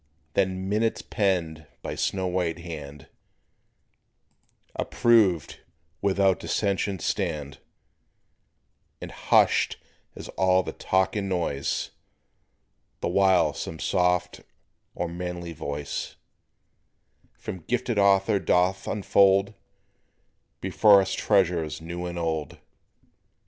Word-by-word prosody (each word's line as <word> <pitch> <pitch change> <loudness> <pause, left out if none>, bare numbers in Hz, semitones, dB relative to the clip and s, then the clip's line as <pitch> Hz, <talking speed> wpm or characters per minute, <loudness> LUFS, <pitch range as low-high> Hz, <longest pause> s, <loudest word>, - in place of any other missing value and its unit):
Then 95 0 0
"minutes" 110 +3 0
penned 85 -6 -1 0.2
by - - -4
snow 95 -1 -1
white 90 -2 -1
hand, 75 -4 -9 1.7
Approved 105 - +2 0.4
without 95 -1 +2
dissension 100 -1 -1
stand; 70 -4 -3 1.4
And - - -8
hushed - - +2 0.4
is - - -9
all 95 0 +2
the - - -6
talk 95 +1 0
and 100 -2 -2
noise 85 -7 -2 1.1
The - - -1
while 95 0 +3
some 80 - -6
soft 90 0 0 0.5
or 90 - -2
manly 85 0 -5
voice 70 -1 -5 1.2
From 95 - -7
gifted 120 +4 -1
author 100 +1 +3
doth 90 +1 +1
unfold 100 -1 +3 1.1
Before 105 -2 +5
us 95 0 -2
treasures 85 -8 +1
new 85 +2 -6
and 85 0 -6
old. 80 -3 -3
90 Hz, 95 wpm, -26 LUFS, 85-100 Hz, 1.7 s, Before